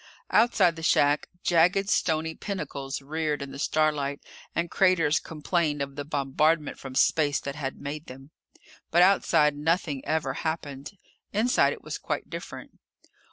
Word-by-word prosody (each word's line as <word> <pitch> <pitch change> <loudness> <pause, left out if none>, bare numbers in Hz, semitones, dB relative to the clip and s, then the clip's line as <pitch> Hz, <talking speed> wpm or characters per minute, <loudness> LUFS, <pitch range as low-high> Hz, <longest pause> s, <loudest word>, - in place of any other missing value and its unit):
Outside 225 -7 +4
the - - -7
shack, 145 -2 +3 0.2
jagged 180 +3 +3
stony 160 -4 +1
pinnacles 140 -8 -5
reared 150 0 -2
in 140 - -8
the 135 - -8
starlight, 150 -2 0 0.4
and 170 0 -1
craters 170 -5 +3
complained 155 -1 -1
of 140 0 -4
the 145 - -4
bombardment 150 +2 0
from 135 -1 -8
space 145 0 +3
that 140 - -5
had 140 -3 -5
made 145 +2 -6
them. 135 +3 -12 0.6
But, 175 +2 +5
outside, 155 -6 +4
nothing 150 -2 -1
ever 155 -4 -1
happened. 150 +2 -5 0.4
Inside, 230 +5 +3
it - - -12
was - - -5
quite - - -4
different. - - -8
150 Hz, 145 wpm, -27 LUFS, 140-165 Hz, 0.6 s, But